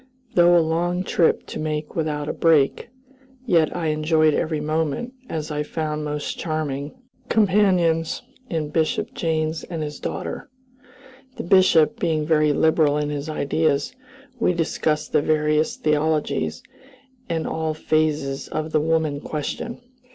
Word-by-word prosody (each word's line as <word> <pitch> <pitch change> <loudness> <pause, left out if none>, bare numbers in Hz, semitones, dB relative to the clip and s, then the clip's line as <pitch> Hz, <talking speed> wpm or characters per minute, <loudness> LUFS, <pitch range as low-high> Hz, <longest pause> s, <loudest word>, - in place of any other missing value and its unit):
Though 175 0 +6
a 165 - +3
long 175 +3 0
trip 170 -3 +2
to - - -7
make 155 -1 -3
without 150 -2 -2
a - - -2
break, 160 +5 +2 0.6
yet 165 - +2
I 165 -3 -1
enjoyed 155 0 +2
every 155 0 -1
moment, 160 - -2 0.2
as 155 -1 -4
I 150 0 -1
found 150 0 -3
most 150 0 -4
charming 150 - -3 0.3
companions 185 -6 +2 0.3
in 155 -3 -2
Bishop 160 0 0
Janes 160 -1 -1
and 165 -3 -4
his 150 -1 -6
daughter. - - -5 0.9
The - - -4
Bishop 185 +2 +4
being 160 -6 0
very 155 -1 +3
liberal 155 -1 +3
in 150 0 -1
his 145 +1 -4
ideas, 155 - 0 0.4
we 180 - +2
discussed 155 -2 -1
the - - +3
various 150 0 +1
theologies, 155 +8 0 0.7
and 165 -1 -1
all 160 -1 -2
phases 150 -3 0
of 155 0 -4
the 155 - +2
woman 160 -2 0
question. 160 - -4
155 Hz, 135 wpm, -23 LUFS, 150-165 Hz, 0.9 s, Though